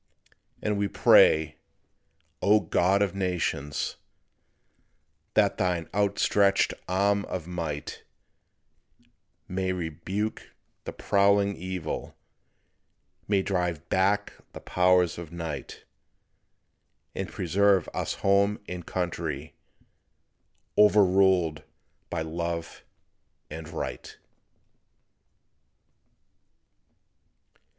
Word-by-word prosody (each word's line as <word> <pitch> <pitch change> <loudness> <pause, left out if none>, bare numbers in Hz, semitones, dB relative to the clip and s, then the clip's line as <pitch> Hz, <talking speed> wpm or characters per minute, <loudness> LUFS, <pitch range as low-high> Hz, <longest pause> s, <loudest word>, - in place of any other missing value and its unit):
And 105 -1 0
we 100 - +1
pray, 80 -5 +5 0.8
O 105 +1 +5
God 95 +1 +2
of 100 - -2
Nations, 90 -6 -2 1.4
That - - +3
thine 90 -3 0
outstretched 100 -1 +2 0.2
arm 100 +2 +2
of 90 -4 -5
might, 80 -4 -5 1.5
May 95 0 -2
rebuke 90 +5 -4 0.3
this - - -6
prowling 100 0 +3
evil, 90 -3 -5 1.1
May 100 -2 +2
drive 90 -4 -2
back 100 +2 +1 0.2
the - - -8
powers 90 -2 +2
of 85 -2 -9
night, 85 -3 -6 1.3
And - - -4
preserve 95 +2 +2
us - - -2
Home 100 +1 +3
and 90 -1 -6
Country 80 -5 -3 1.3
Overruled 95 -6 +4 0.5
by 80 -2 -2
Love 85 +1 -4 0.7
and 80 +1 -7
Right. 80 - -6
90 Hz, 80 wpm, -27 LUFS, 85-100 Hz, 1.5 s, pray